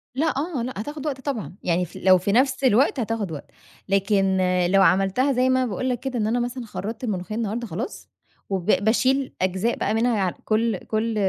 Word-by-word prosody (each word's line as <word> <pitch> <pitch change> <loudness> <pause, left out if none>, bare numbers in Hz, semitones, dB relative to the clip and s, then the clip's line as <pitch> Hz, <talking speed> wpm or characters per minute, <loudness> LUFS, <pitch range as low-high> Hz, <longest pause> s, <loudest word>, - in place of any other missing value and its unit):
لأ، 310 +4 +1
آه، 295 -4 -2
لأ، 255 +2 -4
هتاخد 295 +8 -6
وقت 270 -3 -3
طبعًا 250 -9 -4
يعني 180 0 +1
ف - - -16
لو 185 0 +7
في 190 +3 -1
نفْس 265 +4 +2
الوقت 260 +3 +3
هتاخد 220 -5 -2
وقت، 145 - -8 0.4
لكن 195 -1 +2 0.3
لو 195 +1 +4
عملْتها 195 +9 +3
زي 255 +1 +2
ما 260 - +3
أنا 250 - -2
باقول 235 +6 -2
لك 245 -2 -1
كده 260 -3 -3
إن 215 - +1
أنا 235 +3 +1
مثلًا 245 +1 -3
خرّطت 220 +2 -6
الملوخية 210 -2 -3
النهاردة 230 +1 -2
خلاص، 180 - -6 0.4
وب 190 -3 -2
باشيل 255 +7 +2
أجزاء 190 +5 0
بقى 210 - 0
منها 225 -4 +1 0.2
كل 220 -1 +1
كل 220 +3 -2
225 Hz, 195 wpm, -23 LUFS, 195-255 Hz, 0.4 s, لو